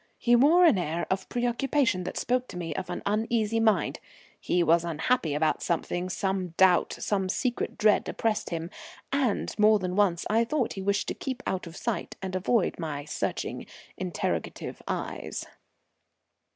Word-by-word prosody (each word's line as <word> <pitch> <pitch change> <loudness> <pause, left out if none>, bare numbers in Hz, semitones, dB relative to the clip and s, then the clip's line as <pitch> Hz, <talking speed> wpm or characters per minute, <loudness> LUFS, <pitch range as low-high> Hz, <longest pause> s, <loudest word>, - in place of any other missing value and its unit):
He 240 0 +4
wore 315 +9 +6
an 255 - +5
air 170 0 -2
of 190 0 -1
preoccupation 245 -4 +1
that - - -5
spoke 250 +1 0
to - - -8
me 165 -3 -3
of 185 +3 -5
an 180 - -4
uneasy 220 +1 +1
mind. 225 -1 +2 0.4
He 175 0 +1
was 165 +1 +4
unhappy 165 0 0
about 155 +1 +1
something; 175 +1 -1
some 190 -2 -2
doubt, 185 -2 +4
some 195 -2 -1
secret 245 +5 -1
dread 210 -1 +3
oppressed 215 -1 -1
him, 165 0 -4 0.4
and 265 -7 0
more 215 0 +6
than 185 -2 -3
once 190 -4 +2
I 225 +2 +3
thought 250 +1 -1
he 195 - -6
wished 200 +1 0
to - - -1
keep 260 -2 -5
out 185 -2 -2
of 170 - -10
sight 235 -2 -3
and 190 -1 -5
avoid 195 +2 +1
my 145 -4 -4
searching 150 - -3 0.3
interrogative - - -3
eyes. - - -4
195 Hz, 165 wpm, -28 LUFS, 175-235 Hz, 0.4 s, wore